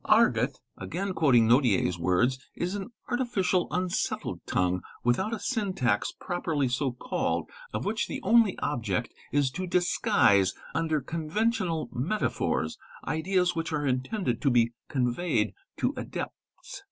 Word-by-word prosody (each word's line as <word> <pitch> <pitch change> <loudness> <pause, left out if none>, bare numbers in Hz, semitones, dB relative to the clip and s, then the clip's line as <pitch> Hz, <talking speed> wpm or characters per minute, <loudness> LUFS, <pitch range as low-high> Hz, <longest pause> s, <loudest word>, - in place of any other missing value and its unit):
| - - -37
' - - -33
Argot," - - +2 0.2
again 190 +3 -3
quoting 130 -9 +4
Nodier's 115 - +3
words, 115 +10 +2 0.2
"is 180 +2 -2
an 205 +2 -4 0.2
artificial, 240 -8 +1
unsettled 180 -1 -1
tongue, 90 0 +1 0.2
without 120 - +1
a 230 - -1
syntax 200 - 0
properly 165 -6 -1
so 130 +2 0
called, 125 - -2 0.2
of - - -3
which - - 0
the - - -4
only 225 -4 +4
object 110 -10 -1 0.2
is 140 -2 +2
to 185 +6 -4
disguise 100 - +3 0.2
under 160 -2 0
conventional 170 - -1
metaphors 150 - -1 0.3
ideas 180 +2 +1
which 165 0 -2
are 150 -2 -1
intended 130 - -1
to 140 - +3
be 120 -2 +3 0.2
conveyed 130 +6 0 0.2
to - - 0
adepts. - - -4
155 Hz, 135 wpm, -28 LUFS, 125-185 Hz, 0.3 s, quoting